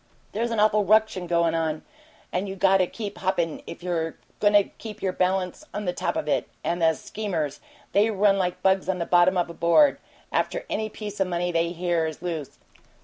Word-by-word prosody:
There's 230 Hz, +2 st, -1 dB
an 230 Hz, -2 st, -1 dB
awful 210 Hz, 0 st, +4 dB
ruction 210 Hz, -3 st, +2 dB
goin' 170 Hz, -1 st, +2 dB
on, 160 Hz, -1 st, -1 dB, 0.5 s
and 190 Hz, +2 st, -2 dB
you 190 Hz, -, -5 dB
got 195 Hz, 0 st, +4 dB
to 185 Hz, -1 st, +2 dB
keep 205 Hz, 0 st, -6 dB
hoppin' 175 Hz, -4 st, -1 dB
if -, -, -9 dB
you're 165 Hz, -3 st, -2 dB, 0.2 s
goin' 205 Hz, 0 st, +3 dB
to 205 Hz, -1 st, +7 dB
keep 215 Hz, +1 st, -10 dB
your 185 Hz, -1 st, 0 dB
balance 185 Hz, -, 0 dB
on 210 Hz, 0 st, -3 dB
the 180 Hz, -, 0 dB
top -, -, -2 dB
of -, -, -2 dB
it. -, -, 0 dB
And 175 Hz, +1 st, -1 dB
the 160 Hz, -1 st, +4 dB
schemers! 170 Hz, -10 st, -3 dB, 0.3 s
They 210 Hz, +3 st, +4 dB
run 200 Hz, -1 st, +3 dB
like 180 Hz, -1 st, -2 dB
bugs 190 Hz, 0 st, +2 dB
on 190 Hz, -, +1 dB
the 170 Hz, -, -2 dB
bottom 180 Hz, +2 st, +4 dB
of 175 Hz, -, +1 dB
a 170 Hz, -, -8 dB
board 170 Hz, -, +4 dB, 0.3 s
after -, -, -1 dB
any 215 Hz, 0 st, -1 dB
piece 210 Hz, -2 st, -6 dB
o' -, -, +4 dB
money 175 Hz, -1 st, -1 dB
they 165 Hz, 0 st, +1 dB
hear 170 Hz, -1 st, 0 dB
is 155 Hz, -, -6 dB
loose. 165 Hz, -5 st, -4 dB
185 Hz, 210 wpm, -25 LUFS, 170-205 Hz, 0.5 s, to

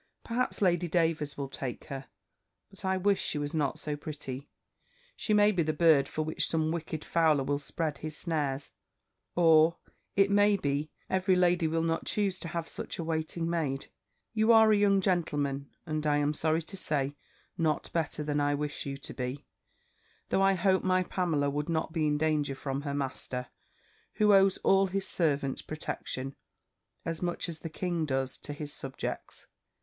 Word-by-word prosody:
Perhaps 235 Hz, -2 st, -1 dB
Lady 175 Hz, -1 st, +3 dB
Davers 160 Hz, -3 st, 0 dB
will 140 Hz, -1 st, -3 dB
take 130 Hz, -2 st, -5 dB
her. 135 Hz, -1 st, -6 dB, 0.6 s
But 195 Hz, -, -9 dB
I 190 Hz, 0 st, +1 dB
wish 200 Hz, +1 st, +2 dB
she -, -, -2 dB
was 145 Hz, 0 st, -3 dB
not 150 Hz, -4 st, 0 dB
so 150 Hz, -1 st, -3 dB
pretty! 145 Hz, -2 st, -6 dB, 0.7 s
She -, -, -2 dB
may 210 Hz, 0 st, +6 dB
be 185 Hz, -4 st, +1 dB
the 155 Hz, -1 st, 0 dB
bird 155 Hz, -4 st, +5 dB
for 155 Hz, -, -2 dB
which 155 Hz, +1 st, -1 dB
some 160 Hz, -1 st, +1 dB
wicked 160 Hz, -1 st, -4 dB
fowler 160 Hz, -4 st, +3 dB
will 145 Hz, +1 st, 0 dB
spread 145 Hz, +1 st, -3 dB
his 155 Hz, -1 st, -5 dB
snares; 145 Hz, -5 st, -2 dB, 0.6 s
or, 165 Hz, -1 st, +5 dB, 0.4 s
it 195 Hz, 0 st, +4 dB
may 205 Hz, 0 st, +5 dB
be, 145 Hz, -2 st, -1 dB, 0.2 s
every 190 Hz, 0 st, +2 dB
lady 175 Hz, -2 st, +3 dB
will 165 Hz, +1 st, 0 dB
not 165 Hz, 0 st, -1 dB
choose 200 Hz, -3 st, 0 dB
to -, -, -6 dB
have 165 Hz, 0 st, -3 dB
such -, -, -5 dB
a 170 Hz, -, -3 dB
waiting 160 Hz, +1 st, -2 dB
maid. 155 Hz, -5 st, -2 dB, 0.4 s
You 220 Hz, +1 st, +4 dB
are 220 Hz, -1 st, +7 dB
a -, -, +6 dB
young 200 Hz, -1 st, +4 dB
gentleman, 145 Hz, -7 st, 0 dB, 0.2 s
and 155 Hz, -2 st, -2 dB
I 145 Hz, 0 st, +3 dB
am 145 Hz, 0 st, +1 dB
sorry 160 Hz, +2 st, +1 dB
to 195 Hz, -, -8 dB
say, 145 Hz, -5 st, -1 dB, 0.4 s
not 160 Hz, -4 st, -1 dB
better 160 Hz, -2 st, -1 dB
than 145 Hz, 0 st, 0 dB
I 145 Hz, 0 st, +2 dB
wish 150 Hz, 0 st, -3 dB
you 135 Hz, 0 st, -4 dB
to 140 Hz, -, -7 dB
be 125 Hz, +2 st, -4 dB, 0.8 s
Though -, -, +2 dB
I 195 Hz, 0 st, +5 dB
hope 190 Hz, +1 st, +2 dB
my 185 Hz, 0 st, +3 dB
Pamela 165 Hz, -6 st, 0 dB
would 150 Hz, +3 st, -2 dB
not 160 Hz, -1 st, -1 dB
be 160 Hz, -3 st, +1 dB
in 150 Hz, 0 st, +2 dB
danger 150 Hz, -3 st, +1 dB
from 135 Hz, 0 st, -3 dB
her 140 Hz, -1 st, -3 dB
master, 130 Hz, -2 st, -3 dB, 0.7 s
who 210 Hz, -1 st, +5 dB
owes 195 Hz, -1 st, +5 dB
all 195 Hz, 0 st, +5 dB
his 195 Hz, +1 st, -2 dB
servants 140 Hz, -5 st, 0 dB
protection, 135 Hz, -3 st, -5 dB, 0.7 s
as 165 Hz, -1 st, -2 dB
much 175 Hz, 0 st, -2 dB
as 165 Hz, -2 st, -6 dB
the 165 Hz, -, -6 dB
king 170 Hz, -1 st, -2 dB
does 135 Hz, -1 st, -1 dB
to -, -, -6 dB
his 145 Hz, 0 st, -6 dB
subjects. 135 Hz, -1 st, -5 dB
160 Hz, 180 wpm, -30 LUFS, 145-180 Hz, 0.8 s, are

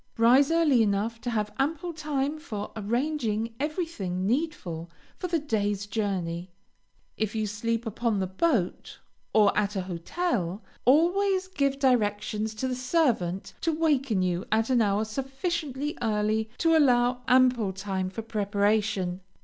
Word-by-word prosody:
Rise 250 Hz, +5 st, +5 dB
early 325 Hz, -7 st, +4 dB
enough 220 Hz, +2 st, 0 dB
to 245 Hz, -, -3 dB
have 210 Hz, -3 st, -1 dB
ample 325 Hz, +5 st, -1 dB
time 300 Hz, -1 st, -2 dB
for 210 Hz, -10 st, -6 dB
arranging 230 Hz, 0 st, -1 dB
everything 290 Hz, -, -2 dB
needful 200 Hz, -, -2 dB, 0.3 s
for 365 Hz, -, -4 dB
the 340 Hz, -1 st, +1 dB
day's 205 Hz, -8 st, -1 dB
journey. 190 Hz, -4 st, -2 dB, 0.7 s
If 220 Hz, 0 st, -2 dB
you 215 Hz, -1 st, 0 dB
sleep 230 Hz, +3 st, -2 dB
upon 225 Hz, 0 st, -1 dB
the 190 Hz, -, 0 dB
boat, 190 Hz, -, -1 dB, 0.3 s
or 210 Hz, -2 st, +4 dB
at 205 Hz, 0 st, 0 dB
a 190 Hz, -, 0 dB
hotel, 185 Hz, -, -2 dB, 0.2 s
always 370 Hz, -, +3 dB
give 280 Hz, -7 st, 0 dB
directions 215 Hz, -4 st, +1 dB
to 260 Hz, +4 st, -2 dB
the 255 Hz, -, -1 dB
servant 250 Hz, -, 0 dB
to 330 Hz, -, +1 dB
waken 280 Hz, -, +1 dB
you 180 Hz, 0 st, 0 dB
at 225 Hz, +3 st, +2 dB
an 245 Hz, -2 st, +4 dB
hour 205 Hz, 0 st, +2 dB
sufficiently 275 Hz, -, -3 dB
early 215 Hz, 0 st, 0 dB
to 330 Hz, -1 st, +3 dB
allow 250 Hz, -4 st, +3 dB
ample 250 Hz, -5 st, +4 dB
time 190 Hz, -1 st, -3 dB
for 220 Hz, +4 st, -6 dB
preparation. 205 Hz, -3 st, 0 dB
225 Hz, 140 wpm, -27 LUFS, 205-280 Hz, 0.7 s, Rise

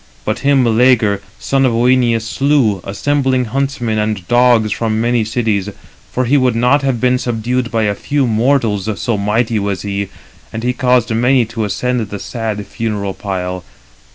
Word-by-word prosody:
But -, -, -1 dB
him 140 Hz, -2 st, +3 dB
Meleager, 115 Hz, -3 st, +3 dB, 0.2 s
son 135 Hz, 0 st, 0 dB
of 130 Hz, -3 st, +2 dB
Œneus, 120 Hz, -1 st, +2 dB
slew, 125 Hz, -5 st, +1 dB
assembling 130 Hz, +5 st, 0 dB
huntsmen 125 Hz, -3 st, -2 dB
and 105 Hz, -4 st, -2 dB
dogs 120 Hz, -3 st, +3 dB
from 110 Hz, +3 st, -1 dB
many 120 Hz, 0 st, +1 dB
cities; 110 Hz, -3 st, -1 dB, 0.4 s
for 130 Hz, -, -1 dB
he 140 Hz, +5 st, +3 dB
would 130 Hz, -3 st, +2 dB
not 125 Hz, +5 st, +3 dB
have 135 Hz, -4 st, -1 dB
been 125 Hz, +1 st, +2 dB
subdued 120 Hz, +1 st, -2 dB
by 115 Hz, -2 st, 0 dB
a 105 Hz, -1 st, +1 dB
few 140 Hz, +6 st, -1 dB
mortals: 115 Hz, -3 st, +1 dB
so 115 Hz, -, -1 dB
mighty 110 Hz, +2 st, 0 dB
was 100 Hz, -3 st, -3 dB
he, 100 Hz, -1 st, -3 dB, 0.4 s
and 115 Hz, -, -5 dB
he 125 Hz, +1 st, 0 dB
caused 125 Hz, -2 st, +1 dB
many 125 Hz, +2 st, +3 dB
to 115 Hz, 0 st, -3 dB
ascend 120 Hz, +2 st, -2 dB
the 100 Hz, -, -5 dB
sad 110 Hz, 0 st, -4 dB
funeral 105 Hz, -4 st, -3 dB
pile. 90 Hz, -2 st, -4 dB
115 Hz, 165 wpm, -16 LUFS, 105-125 Hz, 0.4 s, him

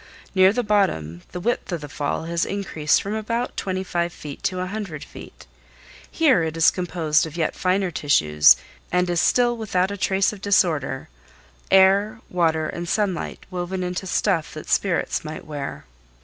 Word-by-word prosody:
Near 190 Hz, 0 st, +6 dB
the 245 Hz, +3 st, -1 dB
bottom 90 Hz, -, 0 dB
the 180 Hz, -, -5 dB
width 235 Hz, +1 st, -2 dB
of 170 Hz, -3 st, -3 dB
the 145 Hz, -, -7 dB
fall 145 Hz, +2 st, -3 dB
has 170 Hz, +1 st, -1 dB
increased 195 Hz, -7 st, 0 dB
from 200 Hz, -, -3 dB
about 230 Hz, +3 st, -2 dB
twenty 190 Hz, -1 st, -2 dB
five 175 Hz, -1 st, -1 dB
feet 145 Hz, -4 st, -9 dB
to 185 Hz, -1 st, 0 dB
a 185 Hz, -, -1 dB
hundred 190 Hz, -6 st, -5 dB
feet. -, -, -12 dB, 0.6 s
Here 290 Hz, -, +3 dB
it 160 Hz, 0 st, -3 dB
is 165 Hz, -, +6 dB
composed 165 Hz, -4 st, 0 dB
of 160 Hz, +1 st, -9 dB
yet 160 Hz, -2 st, 0 dB
finer 185 Hz, 0 st, 0 dB
tissues, 75 Hz, -, +5 dB, 0.4 s
and 180 Hz, 0 st, +2 dB
is 175 Hz, -, +2 dB
still 240 Hz, -1 st, +3 dB
without 195 Hz, -4 st, 0 dB
a 200 Hz, -, -4 dB
trace 190 Hz, +1 st, +1 dB
of 200 Hz, -, -11 dB
disorder—air, 150 Hz, -, +1 dB
water 160 Hz, -3 st, +1 dB
and 170 Hz, +1 st, -5 dB
sunlight 200 Hz, -5 st, -2 dB
woven 185 Hz, +1 st, -3 dB
into 180 Hz, +1 st, -4 dB
stuff 175 Hz, -5 st, 0 dB
that 155 Hz, -, -8 dB
spirits 190 Hz, -3 st, +1 dB
might 155 Hz, 0 st, -7 dB
wear. 145 Hz, -2 st, -6 dB
180 Hz, 165 wpm, -23 LUFS, 155-195 Hz, 0.6 s, Near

